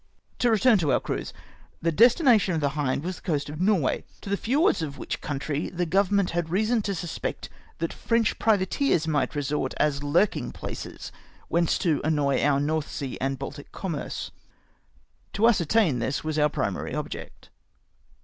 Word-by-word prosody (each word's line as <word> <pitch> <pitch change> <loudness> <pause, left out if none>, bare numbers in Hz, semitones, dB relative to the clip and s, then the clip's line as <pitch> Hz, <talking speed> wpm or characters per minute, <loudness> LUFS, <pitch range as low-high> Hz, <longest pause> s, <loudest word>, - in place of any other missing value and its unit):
To 245 - +3
return 225 0 +4
to 155 -5 +1
our - - +3
cruise. - - -4 0.5
The 165 - 0
destination 235 - +5
of - - 0
the 145 -2 +1
Hind 140 -1 -1
was 180 0 -4
the - - -15
coast 145 -4 -2
of 150 +3 -6
Norway, 185 -8 +2 0.2
to 200 - -7
the, - - +3
fiords 280 - +2
of 145 -3 -4
wliich - - -5
country 145 +1 -3
the 175 0 -2
Government 195 +2 +2
had 170 -1 -2
reason 215 +6 +1
to 200 -1 -2
suspect 175 -1 -4 0.3
that 165 0 -2
French 230 -1 0
pri 220 -1 +4
vateers 190 - +1
might 150 -1 0
resort, 145 0 -1
as 150 -2 +1
hu 145 +7 +3
king - - -5
places - - -7 0.4
whence 170 -1 +2
to 160 -4 +1
annoy 145 -3 +1
our 140 -1 +3
North 155 +1 -1
Sea 135 -3 -4
and 135 +1 -1
Baltic 145 +2 -8
commerce. 170 -7 -4 1.0
To 210 - -2
ascertam 200 - +3
tliis 130 +4 -2
was 155 -1 -1
our 150 0 +4
primary - - -2
object. - - -7
165 Hz, 175 wpm, -26 LUFS, 145-205 Hz, 1.0 s, destination